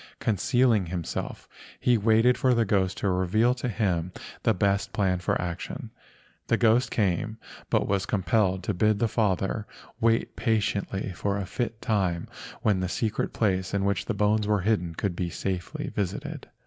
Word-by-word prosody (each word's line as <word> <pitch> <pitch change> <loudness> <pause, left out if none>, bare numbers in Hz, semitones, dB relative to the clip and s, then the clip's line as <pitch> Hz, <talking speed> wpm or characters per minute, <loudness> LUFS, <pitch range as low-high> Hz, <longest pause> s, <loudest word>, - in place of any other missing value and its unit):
Concealing 110 -1 +2
himself 85 -1 -4 0.3
he 125 - +3
waited 115 +3 +4
for 130 -2 +2
the 115 -1 +2
ghost 95 -2 +1
to - - -1
reveal 95 +7 +2
to 125 0 -3
him 90 -6 0 0.3
the - - +3
best 100 0 +1
plan 95 -4 +1
for 90 - 0
action. 85 -1 -5 0.6
The 115 - +3
ghost 115 +2 +3
came, 105 +1 0 0.3
but - - +2
was 100 -1 0
com¬ 95 -4 -1
pelled 95 -1 +2
to 105 - -1
bid 105 +3 +2
the 115 - +2
father 105 -1 0 0.3
wait 115 -1 +2
patiently 100 -3 -1
for 100 +2 -2
a 100 - -3
fit 115 +2 -4
time 95 -6 0 0.4
when 100 -3 +3
the 90 -1 -1
secret 110 +2 -1
place 95 -3 0
in 100 0 +1
which 100 0 0
the - - -2
bones 105 0 +2
were 105 -2 +2
hidden 90 -5 0
could 95 -1 -2
be 90 0 -2
safely 90 0 -3
visited. 100 -1 -4
100 Hz, 170 wpm, -27 LUFS, 95-110 Hz, 0.6 s, waited